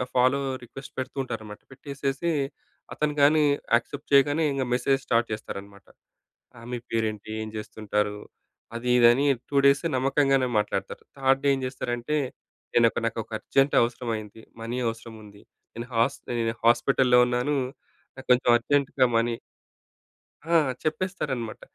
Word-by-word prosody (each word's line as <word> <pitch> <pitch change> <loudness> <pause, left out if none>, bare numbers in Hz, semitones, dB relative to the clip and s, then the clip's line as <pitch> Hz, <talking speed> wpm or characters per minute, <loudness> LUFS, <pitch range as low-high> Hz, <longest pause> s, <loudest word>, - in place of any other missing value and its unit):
Follow 130 +2 +4 0.2
request 135 +3 -11
పెడుతూ 130 +1 -5
ఉంటారనమాట. 105 -4 -7
పెట్టేసేసి 140 +3 -3 0.6
అతను 150 0 -1
కాని 150 +2 +5 0.3
యాక్సెప్ట్ 140 +5 -3
చేయగానే. 145 +3 +4
ఇంగ 135 -1 -1
మెసేజ్ 135 +2 +2
స్టార్ట్ 115 0 +1
చేస్తారనమాట. 100 -2 -7 0.7
ఆ - - -13
మీ 125 - -2
పేరేంటి? 110 -2 -2
ఏం 110 - -6
చేస్తుంటారు? 105 -1 -2 0.6
అది 120 +1 -3
ఇది 120 -1 +7
అని 135 +4 +1 0.2
2 140 - -1
డేస్ 140 +2 +5
నమ్మకంగానే 135 0 +2
మాట్లాడతారు. 100 -2 -3
థర్డ్ 135 0 +2
డే 140 - +3
ఏం - - -5
చేస్తారంటే? 125 +2 -3 0.6
నేనొక 120 0 +3
నాకొక 115 0 -3
అర్జెంట్ 135 +4 +1
అవసరమయ్యింది. 115 -2 -3 0.2
మనీ 115 +2 -4
అవసరం 115 0 -6
ఉంది. 100 -1 -15 0.3
నేను 120 +1 -6
హాస్ 115 +4 +2 0.2
నేను 115 0 -1
హాస్పిటల్లో 125 +1 +4
ఉన్నాను. 125 +4 0 0.6
నాకు 130 - -11
కొంచెం 125 0 +4
అర్జెంట్‌గా 140 +1 +1
మనీ 115 +1 +1 1.1
ఆ! 165 - -4 0.3
చెప్పేస్తారన్నమాట. 155 - -3
125 Hz, 130 wpm, -26 LUFS, 115-140 Hz, 1.1 s, ఇది